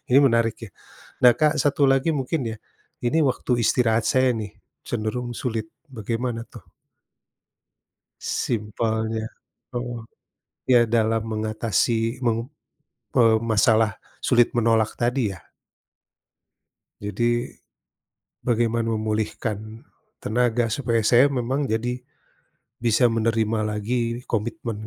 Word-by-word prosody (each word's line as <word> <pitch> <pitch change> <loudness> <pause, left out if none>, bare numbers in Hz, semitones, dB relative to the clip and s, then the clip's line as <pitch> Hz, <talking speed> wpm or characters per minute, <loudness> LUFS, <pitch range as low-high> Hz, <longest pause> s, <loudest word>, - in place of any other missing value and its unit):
ini - - +9
menarik 115 -2 +1
ya. 110 - -8 0.5
Nah, 125 - +8
Kak, 155 0 +3
satu 145 -1 +3
lagi 135 +4 +3
mungkin 135 +4 -1
ya, 110 - -6 0.5
ini 140 +7 +2
waktu 130 - -6
istirahat 115 0 +2
saya 130 -2 +3
nih, 105 -2 -4 0.4
cenderung 120 +2 -3
sulit, 110 -3 -3 0.3
bagaimana 115 +2 -2
tuh? - - -13 1.6
Simpelnya, 110 0 -2 0.5
oh, 120 -2 -4 0.6
iya 120 -2 +6
dalam 115 -1 +1
mengatasi 115 +2 -1
meng 115 +2 0 0.7
eee, 115 -2 +6
masalah 110 -1 +3 0.2
sulit 120 -1 +3
menolak 115 -2 +2
tadi 120 -3 0
ya. 85 - -13 1.6
Jadi, 120 +4 0 0.9
bagaimana 115 -1 +1
memulihkan 110 0 -3 0.3
tenaga? 120 +1 +1
Supaya 115 -4 0
saya 125 +5 +5
memang 135 +2 -1
jadi, 120 +3 -2 0.8
bisa 120 +1 +3
menerima 115 -1 0
lagi 115 +3 -2
komitmen 115 -1 -3
115 Hz, 100 wpm, -24 LUFS, 110-125 Hz, 1.6 s, ini